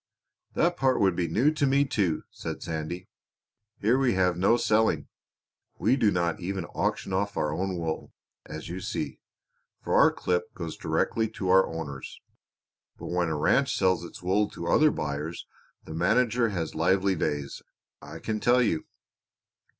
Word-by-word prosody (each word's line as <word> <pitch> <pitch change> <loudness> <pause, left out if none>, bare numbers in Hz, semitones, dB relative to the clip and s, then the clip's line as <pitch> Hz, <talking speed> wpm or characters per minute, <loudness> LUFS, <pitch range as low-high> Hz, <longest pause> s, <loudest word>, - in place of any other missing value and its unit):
"That 175 +1 +2
part 130 -1 +2
would 95 -3 +3
be 85 -1 0
new 120 - +3
to 150 -2 +1
me 140 +1 +3
too," 95 - 0
said - - -6
Sandy. 85 +3 -4 0.7
"Here 115 +6 +2
we 130 -5 +2
have 90 -2 +2
no 100 +7 +3
selling; 110 -1 +2 0.7
we 115 +7 +3
do 115 -6 +3
not 85 -3 0
even 95 0 -3
auction 95 - -1
off 100 +2 -1
our 75 0 0
own 95 +1 -2
wool, 80 -2 -4 0.3
as 80 0 -8
you 90 +3 -5
see, - - -4 0.6
for - - -3
our - - +6
clip 90 -1 -2
goes 85 -3 -5
direct - - -1 0.2
to 95 - -3
our 95 +1 +6
owners. 75 -5 -7 0.8
But - - -7
when 90 -1 +1
a 80 - -1
ranch 135 - +2
sells 95 -3 +2
its 85 - -10
wool 100 +3 +2
to 85 - -7
other 155 0 +5
buyers 75 - -4 0.4
the - - -8
manager 115 +7 +2
has 85 -6 -3
lively 95 +4 +2
days, 75 -3 -3 0.4
I - - -9
can 110 -1 -3
tell 125 +3 +4
you. 80 -9 0
95 Hz, 165 wpm, -27 LUFS, 85-110 Hz, 0.8 s, our